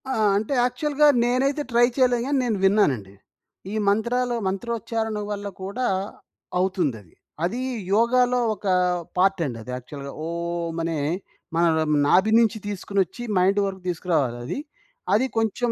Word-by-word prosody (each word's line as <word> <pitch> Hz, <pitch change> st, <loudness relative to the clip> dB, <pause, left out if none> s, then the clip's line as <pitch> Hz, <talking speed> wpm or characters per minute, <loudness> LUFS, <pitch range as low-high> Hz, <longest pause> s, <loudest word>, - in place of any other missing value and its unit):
ఆ! -, -, 0 dB, 0.2 s
అంటే 215 Hz, +7 st, -1 dB
యాక్చువల్‌గా 290 Hz, +4 st, +2 dB, 0.2 s
నేనైతే 270 Hz, +4 st, +1 dB
ట్రై 240 Hz, +1 st, +5 dB
చేయలేదు 245 Hz, -3 st, +3 dB
గానీ 285 Hz, 0 st, +1 dB
నేను 230 Hz, -4 st, 0 dB
విన్నానండి. 140 Hz, -, +2 dB, 0.6 s
ఈ -, -, -3 dB
మంత్రాలో 240 Hz, +4 st, +1 dB
మంత్రోచ్చారణ 225 Hz, +2 st, -2 dB
వల్ల 205 Hz, 0 st, -4 dB, 0.2 s
కూడా 215 Hz, +7 st, -2 dB, 0.7 s
అవుతుందది. 155 Hz, -, -1 dB, 0.3 s
అది 195 Hz, +8 st, -1 dB, 0.4 s
యోగాలో 250 Hz, +2 st, +3 dB
ఒక 210 Hz, -, -12 dB, 0.5 s
పార్ట్ 190 Hz, 0 st, +3 dB
అండి 125 Hz, -5 st, -4 dB
అది 125 Hz, -, -8 dB
యాక్చువల్‌గా 140 Hz, +2 st, -8 dB
ఓం! 170 Hz, 0 st, -3 dB
అనే 165 Hz, -1 st, -1 dB, 0.6 s
మనన 165 Hz, -1 st, +3 dB, 0.2 s
నాభి 190 Hz, +7 st, +4 dB
నుంచి 225 Hz, -1 st, +2 dB
తీసుకొనోచ్చి 200 Hz, +1 st, -2 dB
మైండ్ 190 Hz, +3 st, +3 dB
వరకు 190 Hz, -1 st, -5 dB
తీసుకురావాలది. 150 Hz, -, -1 dB, 0.5 s
అది 220 Hz, +6 st, +4 dB
కొంచెం 225 Hz, +2 st, 0 dB
200 Hz, 125 wpm, -24 LUFS, 170-240 Hz, 0.7 s, ట్రై